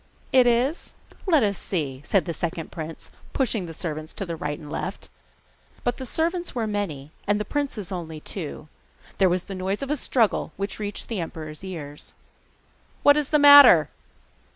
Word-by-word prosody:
'Is 255 +4 +3 0.2
it? - - -20 0.2
let 305 -7 +5
us 200 -2 0
see!' 140 -8 -3
said 195 +4 +1
the 170 - -3
second 165 0 -4
prince, 160 0 -8 0.2
pushing 225 -8 0
the 165 - -7
servants 155 -2 -5
to 175 -4 -4
right 150 -2 -4
and 155 - -11
left. - - -5 0.7
But 245 0 0
the 260 - -7
servants 340 +3 -1
were 235 -2 0
many, 190 -10 -3 0.2
and 205 +1 +2
the 210 - -2
princes 265 -10 -3
only 165 -4 -5
two. 155 -2 -6 0.5
There 190 -2 +5
was 180 0 0
the 200 - -8
noise 190 +5 -2
of 275 - -3
a 300 - +1
struggle, 235 -4 +1
which 200 +1 -4
reached 205 -1 -4
the 225 -4 -3
emperor's 155 -1 -6
ears. 150 -6 -8 0.9
'What 285 - +7
is 300 -2 0
the 305 - +4
matter? 285 - +9
195 Hz, 175 wpm, -25 LUFS, 160-245 Hz, 0.9 s, matter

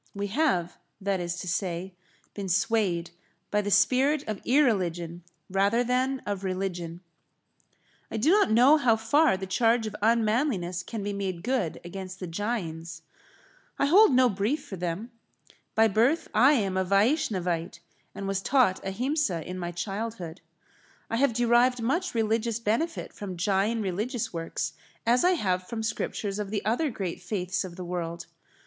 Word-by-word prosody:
We 200 0 -3
have, 205 - +1 0.2
that 195 -1 -1
is 175 0 -3
to 185 - -7
say, 180 +1 -2 0.4
been 200 -2 -5
swayed 190 -3 +1 0.4
by 210 - +2
the 205 - -3
spirit 270 +7 +3
of 215 -2 -4
irreligion 180 - +1 0.2
rather 200 +5 +2
than 255 +2 0
of 200 -2 -3
religion. 180 -3 -3 1.1
I - - -4
do 265 +10 +3
not 410 - +4
know 250 +7 +6
how 245 -6 +3
far 225 +2 +3
the 190 - -5
charge 225 +4 +2
of 215 - -5
unmanliness 220 - +1
can 215 +3 -6
be 205 0 -2
made 190 -4 -3
good 240 -9 -1
against 185 +1 -7
the 185 - -4
Jains. 170 -3 -4 0.7
I - - +2
hold 380 +6 +6
no 255 0 +5
brief 235 +8 -1
for 205 - -7
them. 180 +6 -4 0.6
By 225 0 +5
birth 235 - +2
I 260 +7 +6
am 195 -8 0
a 190 - +2
Vaishnavite, 185 - +1 0.4
and 195 - -5
was 195 0 -1
taught 250 -6 +2
Ahimsa 225 - -1
in 180 +1 -5
my 175 -1 -3
childhood. 195 -1 -5 0.7
I 230 - +1
have 275 +1 +3
derived 240 +2 +3
much 260 +6 -1
religious 225 0 0
benefit 235 +10 -1
from 190 -3 -7
Jain 205 +4 +1
religious 210 +6 -2
works 165 -1 -3 0.3
as 240 +2 +3
I 365 +1 +5
have 185 - -1
from 225 -1 -4
scriptures 210 -2 -3
of 205 -2 -3
the 210 -1 -3
other 245 +8 +1
great 190 -7 -4
faiths 180 0 -2
of 180 -2 -8
the 180 0 -7
world. 170 -1 -4
205 Hz, 160 wpm, -27 LUFS, 185-240 Hz, 1.1 s, know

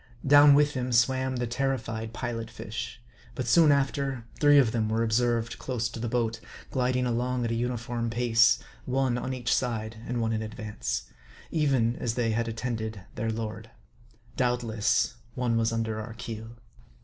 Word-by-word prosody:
Down 145 0 +8
with 150 0 +4
him 125 -1 -2
swam 130 +2 +2
the 120 0 -1
terrified 120 -3 -2
Pilot 115 -2 -4
fish; 110 +1 -6 0.4
but 130 - -3
soon 155 +6 +6
after, 135 -3 0
three 145 -1 +6
of 130 -5 +5
them 110 -2 0
were 110 +1 +1
observed 115 0 +1
close 120 -3 -2
to 115 - -8
the 115 0 -2
boat, 115 -1 0 0.3
gliding 125 -1 +1
along 125 +1 0
at 115 - -1
a - - +1
uniform 120 0 -2
pace; 115 -1 +4 0.3
one 130 -1 +1
an 125 +1 -3
each 125 -3 0
side, 110 -3 -2
and 120 0 -2
one 115 -1 0
in 110 - -1
advance; 110 - -4 0.5
even 135 -7 +2
as 115 -1 -2
they 115 -2 +1
had 115 +1 0
attended 110 -2 -4
their 115 - -2
lord. 110 0 -4 0.7
Doubtless, 120 -2 +1 0.2
one 125 -2 0
was 115 0 +2
under 110 -1 -2
our 110 +1 -8
keel. 115 0 -7
120 Hz, 165 wpm, -28 LUFS, 115-125 Hz, 0.7 s, Down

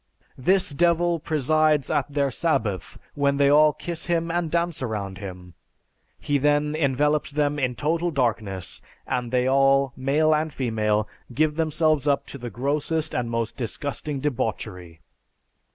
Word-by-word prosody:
This 185 +6 +2
Devil 170 +2 +2
presides 155 -1 +2
at 145 -2 0
their 140 -1 0
sabbath 110 - -1 0.2
when 140 -1 +1
they 140 0 +4
all 150 +1 +6
kiss 170 +3 -6
him 170 -1 0
and 170 -1 -1
dance 170 -1 -1
around 100 -6 -4
him. 90 -3 -9 0.7
He 145 -1 0
then 145 +1 +2
envelops 150 0 +1
them 145 0 0
in 125 -2 0
total 165 +6 0
darkness, 110 - -2 0.2
and 125 -1 -2
they 125 0 +1
all, 135 0 +3
male 145 +4 +2
and 155 +1 0
female, 110 -5 0 0.2
give 150 +4 +1
themselves 155 -2 +1
up 140 -1 +2
to 140 - -8
the 120 0 -5
grossest 145 +6 -1
and 120 -1 -1
most 115 -1 -2
disgusting 140 +4 -4
debauchery." 100 - -3
145 Hz, 145 wpm, -24 LUFS, 120-155 Hz, 0.7 s, all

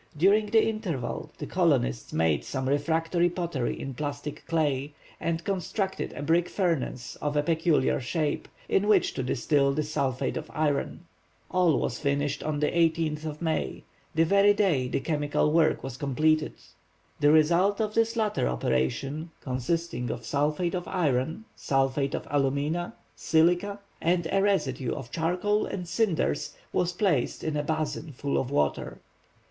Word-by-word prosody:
During 200 +6 +4
the 220 +1 +4
interval 185 - -3
the - - -5
colonists 60 0 +1
made 80 -3 +1
some 130 -1 -3
refractory 165 +5 +1
pottery 170 -8 -2
in 135 - -5
plastic 145 +2 -5
clay, 145 -3 0 0.3
and 165 0 -2
constructed 190 +1 -2
a 145 - -6
brick 165 +3 +2
furnace 165 -9 -1
of 150 0 -2
a 145 - +3
peculiar 160 -3 +2
shape, 150 +4 -2 0.2
in 200 +2 +2
which 205 -4 +4
to - - -3
distil 140 +2 +2
the 155 +2 0
sulphate 140 -3 -1
of 160 - -6
iron. 150 -2 0 0.5
All 180 -5 +3
was 125 - -2
finished 140 0 0
on 150 -1 -2
the 150 - +2
18th 160 -2 +1
of 150 +1 -5
May, 160 -2 -2 0.3
the 165 +1 +4
very 200 +3 +5
day 165 -12 +2
the - - -1
chemical 150 -1 0
work 160 0 +3
was 130 -2 -6
completed. 155 +3 +1 0.7
The 145 0 +5
result 170 +6 +4
of 215 -1 -1
this 230 +1 +2
latter 215 -2 +1
operation, 65 - -1
consisting 130 0 -2
of 115 -1 -5
sulphate 150 +6 0
of 180 -1 -3
iron, 160 - 0
sulphate 135 0 0
of - - -5
alumina, 145 +5 0 0.2
silica, 175 +5 +2 0.2
and 170 0 +1
a 195 - +3
residue 140 -11 0
of 120 -3 -8
charcoal 180 +6 0
and 180 -3 -5
cinders, 190 - 0 0.2
was 180 - +1
placed, 180 - 0
in 155 -1 -1
a 150 - +1
basin 155 0 -3
full 140 +2 -1
of 130 - -2
water. 75 - -1
155 Hz, 155 wpm, -27 LUFS, 140-175 Hz, 0.7 s, very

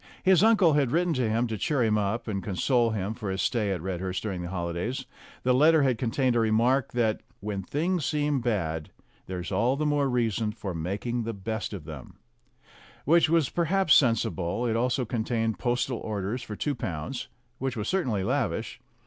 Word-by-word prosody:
His 185 -2 +5
uncle 210 -7 +5
had 145 -4 +2
written 170 +5 +1
to 125 -5 0
him 115 +3 +1
to 110 -3 -4
cheer 140 +1 +1
him 110 -2 +2
up, 105 +3 -1
and 100 -3 -2
console 115 +5 +1
him 105 -1 -2
for 110 -3 -5
his 95 0 -2
stay 110 -5 0
at 90 -4 -3
Red 95 -2 -3
hurst 95 0 -3
during 95 -5 -3
the 85 - -5
holidays. 90 +9 -3 0.4
The 125 - +3
letter 155 +3 +5
had 130 -4 +1
contained 125 +1 +1
a - - +3
remark 115 +4 +2
that 115 -3 +1 0.2
"When 100 -1 -3
things 165 - -1
seem 145 -1 0
bad, 80 -10 -1 0.4
there's 90 0 -5
all 115 +7 +2
the 150 +2 -1
more 145 -2 +2
reason 115 -3 0
for 100 -4 -5
making 100 +9 -2
the 115 0 -3
best 110 +2 -4
of - - -7
them," - - -10 0.9
which 165 +2 +4
was 165 -4 +3
perhaps 175 -1 +2
sensible; 115 - +2
it 115 -2 0
also 125 +2 +1
contained 115 -1 -1
postal 125 0 0
orders 105 +3 -3
for 110 -3 -7
two 145 +7 -1
pounds, 95 - -4 0.3
which 130 -2 -2
was 105 - -3
certainly 125 - 0
lavish. - - -2
115 Hz, 190 wpm, -27 LUFS, 100-135 Hz, 0.9 s, His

